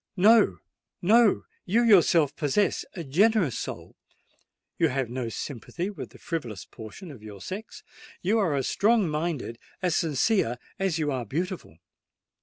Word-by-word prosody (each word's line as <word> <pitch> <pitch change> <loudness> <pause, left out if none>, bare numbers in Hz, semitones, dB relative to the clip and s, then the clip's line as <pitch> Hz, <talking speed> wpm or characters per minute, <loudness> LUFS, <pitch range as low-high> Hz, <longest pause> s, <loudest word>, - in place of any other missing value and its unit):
No—no: 215 +1 +3 0.2
you 225 +6 +2
yourself 170 - +5
possess 165 +7 +1
a 170 - -5
generous 180 - +2
soul—you - - -6
have 130 -3 -2
no 125 -2 -3
sympathy 145 - -5
with 205 - -8
the - - -16
frivolous 120 - -5
portion 115 - -10
of 130 -7 -12
your 105 -2 -10
sex—you 200 - -5
are 175 -8 +1
as 135 -2 -1
strong 215 -2 +3
minded, 150 -6 -3 0.2
as 180 -3 0
sincere 155 - +1 0.2
as 190 -4 0
you 150 -2 0
are 130 -2 -2
beautiful. 165 - -4
165 Hz, 130 wpm, -27 LUFS, 130-200 Hz, 0.2 s, yourself